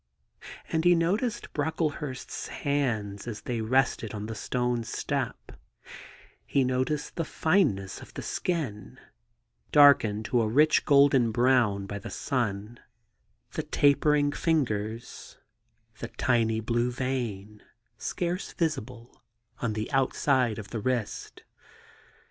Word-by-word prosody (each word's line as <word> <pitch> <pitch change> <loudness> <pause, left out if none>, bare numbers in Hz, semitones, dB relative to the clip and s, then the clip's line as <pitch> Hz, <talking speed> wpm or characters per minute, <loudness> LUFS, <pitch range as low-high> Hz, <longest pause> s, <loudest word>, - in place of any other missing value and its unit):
And 160 -1 +1
he 175 0 +6
noticed 200 +8 -1
Brocklehurst's 150 -3 -3
hands 120 -8 -2
as 105 -3 -5
they 115 +1 -3
rested 115 -2 +1
on 105 0 -5
the 110 - -5
stone 125 +1 -1
step: - - -3 0.9
he 140 - +1
noticed 130 +4 -1
the 165 - 0
fineness 155 - +1
of - - -12
the - - -5
skin, 130 - -3 0.7
darkened 115 -8 +6
to 120 +1 +2
a 110 - +1
rich 150 +8 +4
golden 140 -5 +5
brown 120 -4 +2
by 100 +1 -5
the - - -8
sun; 115 -3 -3 0.7
the - - -2
tapering 145 0 +3
fingers; 115 -9 -2 0.6
the 120 - -4
tiny 115 -2 +1
blue 120 +2 0
vein, 115 -5 -4 0.4
scarce 175 +2 -3
visible, 125 -7 -4 0.4
on 115 -3 -1
the 110 0 -3
inside 130 -3 +2
of 105 - -8
the 115 - -3
wrist. 120 -1 -3
125 Hz, 115 wpm, -28 LUFS, 110-145 Hz, 0.9 s, he